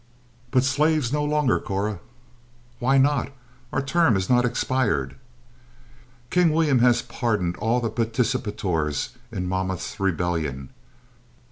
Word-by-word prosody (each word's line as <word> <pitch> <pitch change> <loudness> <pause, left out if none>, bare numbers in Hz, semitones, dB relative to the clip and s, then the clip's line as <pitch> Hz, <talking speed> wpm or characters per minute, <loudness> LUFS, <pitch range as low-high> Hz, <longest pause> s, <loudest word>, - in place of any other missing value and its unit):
"But 130 0 +3
slaves 145 -1 +1
no 150 0 +1
longer, 150 -3 +2
Cora." 100 0 -3 0.8
"Why 135 +3 +3
not? 140 +1 +2 0.4
Our - - -1
term 140 -3 +3
has 95 +2 -1
not 125 0 +4
expired." 120 - 0 1.2
"King 175 -2 +4
William 155 -5 +3
has 120 0 +4
pardoned 110 -7 -1
all 115 +3 +1
the 115 -3 -2
participators 110 - -1 0.2
in 90 -5 -3
Monmouth's 95 0 -3
rebellion." 80 -8 -1
115 Hz, 115 wpm, -24 LUFS, 95-135 Hz, 1.2 s, not